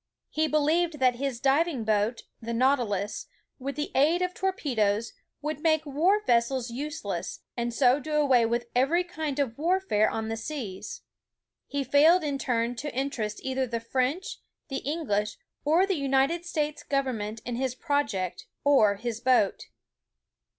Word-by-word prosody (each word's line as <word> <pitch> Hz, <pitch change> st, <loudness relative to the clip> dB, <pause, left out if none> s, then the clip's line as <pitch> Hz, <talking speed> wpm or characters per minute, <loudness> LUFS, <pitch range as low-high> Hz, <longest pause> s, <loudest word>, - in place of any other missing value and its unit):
He 315 Hz, 0 st, +1 dB
believed 310 Hz, +2 st, +2 dB
that 255 Hz, -3 st, +3 dB
his 270 Hz, -2 st, -2 dB
diving 275 Hz, 0 st, +2 dB
boat, 215 Hz, +2 st, 0 dB, 0.2 s
the 235 Hz, +1 st, -4 dB
Nautilus, 230 Hz, -6 st, +1 dB, 0.3 s
with 275 Hz, +2 st, -4 dB
the 295 Hz, -, -3 dB
aid 315 Hz, +7 st, +3 dB
of 360 Hz, 0 st, -1 dB
torpe 375 Hz, -10 st, -2 dB
does, 210 Hz, +1 st, +1 dB, 0.3 s
would 305 Hz, -1 st, -2 dB
make 315 Hz, -1 st, +2 dB
war 345 Hz, +9 st, +2 dB
vessels 235 Hz, +1 st, +1 dB
useless, 295 Hz, +6 st, -4 dB
and 240 Hz, 0 st, -2 dB
so 255 Hz, +2 st, +4 dB
do 305 Hz, +2 st, -5 dB
away 270 Hz, -5 st, +4 dB
with 235 Hz, +1 st, -1 dB
every 290 Hz, +8 st, +3 dB
kind 315 Hz, -5 st, -4 dB
of 275 Hz, -3 st, -1 dB
warfare 335 Hz, -, +2 dB
on 220 Hz, 0 st, -3 dB
the 225 Hz, 0 st, -3 dB
seas. 255 Hz, -, -6 dB, 0.6 s
He 285 Hz, -1 st, -2 dB
failed 305 Hz, +6 st, +5 dB
in 285 Hz, -2 st, -2 dB
turn 235 Hz, -2 st, 0 dB
to 295 Hz, +4 st, -4 dB
interest 245 Hz, -6 st, -2 dB
either 265 Hz, 0 st, -1 dB
the 230 Hz, -1 st, -2 dB
French, 260 Hz, +9 st, -2 dB, 0.3 s
the 270 Hz, -, -2 dB
English, 245 Hz, -9 st, -1 dB, 0.3 s
or 325 Hz, +6 st, +4 dB
the 390 Hz, -, 0 dB
United 275 Hz, +5 st, +1 dB
States 300 Hz, -3 st, -2 dB
government 230 Hz, -6 st, -2 dB
in 240 Hz, 0 st, -3 dB
his 260 Hz, -1 st, -1 dB
project, 225 Hz, -, -1 dB, 0.2 s
or 240 Hz, -8 st, +5 dB
his 230 Hz, +2 st, -4 dB
boat. 245 Hz, -5 st, +2 dB
270 Hz, 155 wpm, -27 LUFS, 235-305 Hz, 0.6 s, failed